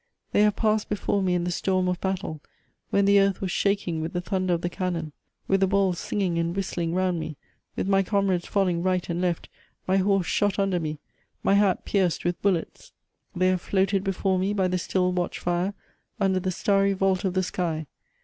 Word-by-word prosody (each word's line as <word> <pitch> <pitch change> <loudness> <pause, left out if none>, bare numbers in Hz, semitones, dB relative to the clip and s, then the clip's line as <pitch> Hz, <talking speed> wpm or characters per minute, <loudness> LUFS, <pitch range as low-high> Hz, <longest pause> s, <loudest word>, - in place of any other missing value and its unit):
They - - +3
have 210 -1 +4
passed 215 -1 +1
before 205 -1 0
me 180 -1 +1
in 175 - 0
the 180 - -1
storm 185 +1 0
of 180 -1 -1
battle, 190 -5 -3 0.5
when 200 0 +3
the 200 0 +6
earth 195 -1 +2
was 190 -2 -2
shaking 195 -6 0
with 160 +1 -4
the 175 - 0
thunder 185 -1 -1
of 170 - -4
the 175 - -1
cannon, 175 -4 -3 0.4
with 195 - +3
the 195 - +3
balls 190 -2 +1
singing 185 -5 -1
and 170 +1 -1
whistling 175 -3 -2
round 185 -2 +1
me, 155 -2 -6 0.4
with - - -2
my 195 0 +4
comrades 195 -2 0
fall 200 -1 +2
ing 170 -1 0
right 185 0 0
and 170 +1 -1
left, 175 -2 -1 0.4
ray 190 +1 +2
horse 195 -1 +2
shot 205 +2 +1
under 195 -3 +1
me, 155 -2 -3 0.5
my - - +3
hat 200 -2 +3
pierced" 185 -5 0
with 175 0 -1
bullets. 185 -5 -1 0.4
They 185 +1 +3
have 185 -1 +1
floated 195 +1 +1
before 195 -1 0
me 195 +2 0
by 190 -2 +2
the 180 0 0
still 180 +1 0
watch 180 -1 -2
fire 175 +3 -1 0.4
under 190 -2 +2
the 185 +1 -2
starry 195 +2 +2
vault 190 -1 +1
of 190 -2 -1
the 185 - +2
sky. 165 -3 -2
185 Hz, 210 wpm, -26 LUFS, 175-195 Hz, 0.5 s, the